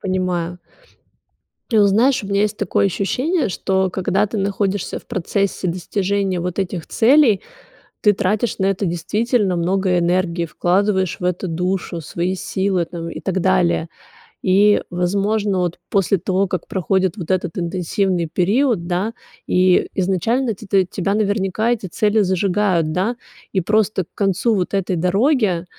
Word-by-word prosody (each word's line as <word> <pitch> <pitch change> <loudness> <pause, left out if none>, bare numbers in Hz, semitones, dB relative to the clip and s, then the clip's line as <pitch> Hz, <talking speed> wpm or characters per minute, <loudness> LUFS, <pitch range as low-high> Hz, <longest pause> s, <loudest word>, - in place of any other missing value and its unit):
Понимаю. 180 -2 -2 1.1
Ты 220 -2 +4
знаешь, 240 +4 +3
у - - -6
меня 200 0 0
есть 210 0 0
такое 200 0 +1
ощущение, 255 - 0
что 190 0 0
когда 190 +2 0
ты 215 - -5
находишься 195 0 -1
в - - -21
процессе 195 -2 -1
достижения 190 +1 -1
вот 180 +2 -4
этих 180 -3 -2
целей, 240 -3 +4 0.6
ты 210 - +5
тратишь 205 +4 -1
на 190 - +1
это 195 +1 0
действительно 200 +3 0
много 185 +1 +1
энергии, 175 0 0
вкладываешь 190 +2 0
в 180 - -6
это 180 +1 -1
душу, 180 0 -2
свои 175 +5 -2
силы, 190 -1 -1
там, 170 -1 -7
и - - -7
так 190 -1 -1
далее. 180 -3 +2 0.5
И, 200 +2 +4
возможно, 200 +3 0
вот, 175 -1 -1
после 195 0 +2
того, 190 +3 0
как 180 -2 -4
проходит 190 0 0
вот 175 0 -4
этот 180 -2 -1
интенсивный 180 0 -1
период, 200 0 +1
да, 185 +6 -1 0.3
и 185 0 +3
изначально 210 +7 0
ти 215 - -12
ты, 190 -1 +3
тебя 195 +2 -1
наверняка 205 +1 0
эти 210 -5 -2
цели 210 +4 +1
зажигают, 185 -3 +1
да, 215 +7 -1 0.3
и 190 - +1
просто 210 -1 +1
к - - -50
концу 205 +3 +1
вот 185 +1 -2
этой 190 -2 0
дороги, 190 - +1
190 Hz, 150 wpm, -19 LUFS, 180-205 Hz, 1.1 s, ты